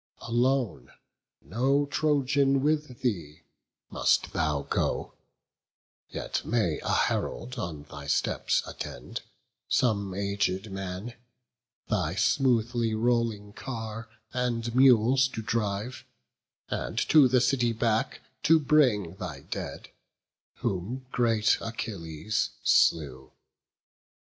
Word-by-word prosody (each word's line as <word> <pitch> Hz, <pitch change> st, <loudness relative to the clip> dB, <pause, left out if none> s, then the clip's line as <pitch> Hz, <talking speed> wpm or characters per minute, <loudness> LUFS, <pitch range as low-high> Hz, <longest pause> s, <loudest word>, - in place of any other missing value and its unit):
Alone, 120 Hz, -, 0 dB, 0.5 s
no 130 Hz, -, +1 dB
Trojan 140 Hz, -2 st, +2 dB
with 150 Hz, -4 st, 0 dB
thee, 85 Hz, -, -2 dB, 0.5 s
must -, -, +2 dB
thou 75 Hz, -3 st, 0 dB
go; -, -, -1 dB, 1.0 s
Yet -, -, -3 dB
may 105 Hz, -9 st, 0 dB
a -, -, -5 dB
herald 125 Hz, +1 st, -1 dB
on 80 Hz, -7 st, -5 dB
thy 70 Hz, -1 st, -10 dB
steps 70 Hz, -, +1 dB
attend, 60 Hz, -, -7 dB, 0.5 s
Some 100 Hz, -6 st, +1 dB
aged 100 Hz, 0 st, -1 dB
man, 95 Hz, +4 st, -5 dB, 0.7 s
thy 90 Hz, -5 st, 0 dB
smoothly 120 Hz, +1 st, +2 dB
rolling 115 Hz, -3 st, 0 dB
car 115 Hz, -2 st, -6 dB, 0.2 s
And 120 Hz, -2 st, -1 dB
mules 130 Hz, 0 st, +5 dB
to 115 Hz, -3 st, -6 dB
drive, 105 Hz, +2 st, -2 dB, 0.6 s
and -, -, -4 dB
to 150 Hz, -4 st, +7 dB
the 125 Hz, 0 st, +3 dB
city 125 Hz, -1 st, +2 dB
back 110 Hz, -1 st, 0 dB, 0.2 s
To 165 Hz, 0 st, +6 dB
bring 125 Hz, -, +2 dB
thy -, -, -6 dB
dead, -, -, -6 dB, 0.7 s
whom 110 Hz, +8 st, -3 dB
great 115 Hz, -3 st, +2 dB
Achilles 100 Hz, -5 st, -3 dB
slew. 65 Hz, -5 st, +2 dB
115 Hz, 100 wpm, -28 LUFS, 95-125 Hz, 1.0 s, to